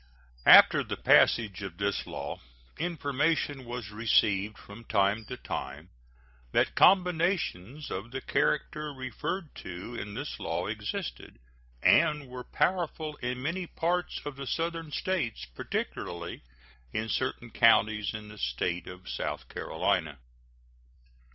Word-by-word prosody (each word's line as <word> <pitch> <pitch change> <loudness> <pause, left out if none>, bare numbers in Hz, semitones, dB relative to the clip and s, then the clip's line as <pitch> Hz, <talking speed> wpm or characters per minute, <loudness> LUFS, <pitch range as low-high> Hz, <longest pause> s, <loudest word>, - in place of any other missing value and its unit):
After - - +9
the - - -4
passage 105 -4 +4
of 95 -4 -6
this 100 0 -1
law - - -5 0.4
information 145 -3 0
was 120 -4 -6
received 105 -2 +2
from 105 +3 -12
time 100 +2 +2
to - - -6
time - - -6 0.6
that - - +3
combinations 170 - +2
of 100 +5 -4
the 130 +2 -4
character 150 +2 0
referred 140 +6 -4
to 90 +6 -7
in 105 -3 -6
this - - -5
law - - -2
existed - - -5 0.5
and 150 -4 +4
were 125 0 -7
powerful 160 -3 -1
in 125 +1 -3
many 175 +4 -2
parts 175 +2 -1
of 145 -2 -5
the 140 -1 -6
Southern 165 0 -2
States, 160 - -2
particularly 85 +6 -4 0.5
in 110 +8 -2
certain 120 -1 -2
counties 110 -2 +4
in 105 -1 -7
the 105 0 -11
State 85 +8 -2
of 90 0 -10
South - - -4
Carolina. 80 -8 -1
120 Hz, 125 wpm, -29 LUFS, 100-155 Hz, 0.6 s, After